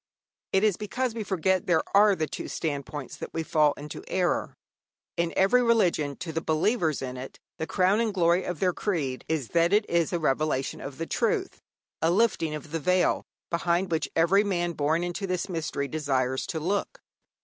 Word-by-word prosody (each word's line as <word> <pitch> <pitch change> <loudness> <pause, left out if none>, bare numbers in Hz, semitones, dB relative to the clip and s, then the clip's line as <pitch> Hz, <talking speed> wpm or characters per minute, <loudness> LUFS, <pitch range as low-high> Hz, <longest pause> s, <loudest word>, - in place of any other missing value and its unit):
It 195 +1 +3
is 210 -4 +3
because 240 +4 -2
we 225 -1 -4
forget 190 -1 0
there 175 -3 +3
are 205 0 +6
the 160 - -1
two 150 - -6
standpoints 145 -2 -4
that - - -7
we 165 - -1
fall 150 -2 +3
into 150 +1 -8
error. 180 -2 0 0.6
In 170 -1 0
every 195 +6 +5
religion, 180 - +2
to 165 - -6
the 165 +1 -2
believers 160 - +1
in 125 -1 -5
it, 130 +1 -8 0.2
the 160 - -2
crown 190 +2 +2
and 230 -2 +1
glory 175 -1 +2
of 180 -3 -4
their 180 -2 +2
creed 150 -12 -2
is 155 -7 -1
that 170 +1 +3
it 210 +1 +3
is 170 -2 +1
a 175 - +1
revelation 150 -3 0
of 140 +4 -6
truth, - - -1 0.4
a 160 - +3
lifting 175 -5 +2
of 150 0 -9
the 165 - -1
veil, 180 +4 +2 0.3
behind 170 +2 0
which 160 -1 0
every 180 +5 +4
man 175 -4 0
born 160 +2 0
into 175 +3 -3
this 180 0 -1
mystery 160 -5 -3
desires 130 -3 -1
to 160 - -3
look. 200 - -2
170 Hz, 185 wpm, -27 LUFS, 155-190 Hz, 0.6 s, are